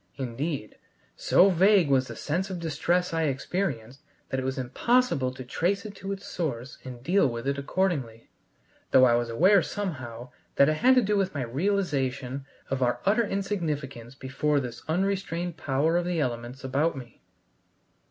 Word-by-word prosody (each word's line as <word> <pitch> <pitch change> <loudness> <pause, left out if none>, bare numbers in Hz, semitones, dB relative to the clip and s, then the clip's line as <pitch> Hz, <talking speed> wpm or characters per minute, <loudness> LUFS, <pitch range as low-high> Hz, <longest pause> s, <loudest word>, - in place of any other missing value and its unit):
Indeed, 135 -1 -4 0.4
so 195 +2 +4
vague 190 0 +5
was 130 -2 +2
the - - -7
sense 180 +6 -2
of 185 -2 -4
distress 170 +2 0
I 165 -1 +1
experienced, 135 - -3 0.3
that 130 - -1
it - - -3
was 130 +1 -2
impossible 135 - +1
to 130 - -7
trace 180 - -1
it 210 - -7
to 195 +1 -5
its 195 0 -5
source 135 -6 -4
and 125 -2 -9
deal 180 +3 +3
with 115 +1 -4
it 140 0 0
accordingly, 140 -8 -1 0.6
though 130 - +6
I 120 - +4
was 120 0 +1
aware 185 - +5
somehow 130 - -5 0.2
that 140 - +5
it 155 - 0
had 260 +9 +5
to 255 - +5
do 205 0 +1
with 190 -4 0
my 140 - -1
realization 135 - -1 0.2
of 135 -1 -1
our 120 -1 +1
utter 215 +3 +3
insignificance 150 - -3
before 140 +3 0
this 120 -3 -6
unrestrained 175 -1 -1
power 150 +5 +1
of 175 - 0
the 175 -2 -1
elements 125 -1 -3
about 140 +4 0
me. 120 -3 -11
145 Hz, 170 wpm, -27 LUFS, 130-185 Hz, 0.6 s, though